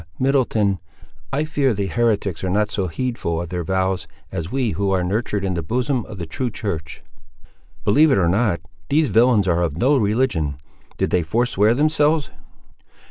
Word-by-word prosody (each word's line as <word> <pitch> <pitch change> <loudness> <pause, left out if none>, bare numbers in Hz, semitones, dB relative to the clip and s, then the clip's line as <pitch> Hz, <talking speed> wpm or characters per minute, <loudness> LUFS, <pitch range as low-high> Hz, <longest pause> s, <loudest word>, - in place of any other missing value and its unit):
Middleton, 115 -8 +1 0.5
I 145 +3 0
fear 140 -6 +1
the 100 0 -1
heretics 100 -3 0
are 95 - -1
not 105 +2 +1
so 95 -3 -1
heedful 90 -4 -2
of 85 -1 -5
their 90 -1 -3
vows 95 +1 -1 0.2
as 85 +2 -4
we 130 -4 0
who 100 0 -1
are 95 -2 +1
nurtured 105 +1 -1
in 95 - -1
the 85 - -2
bosom 120 - -1
of 110 - -9
the 85 - -4
true 120 +11 -3
church!" 85 -8 -5 0.8
"Believe 150 +9 +5
it - - +4
not; 95 -3 +1 0.3
these 150 0 +3
villains 115 -4 +4
are 85 -1 +2
of 80 -3 -1
no 135 +10 +3
religion: 105 - +1 0.4
did - - 0
they 90 - +3
forswear 110 +4 +2
themselves?" 150 +1 +2
105 Hz, 170 wpm, -21 LUFS, 90-125 Hz, 0.8 s, Believe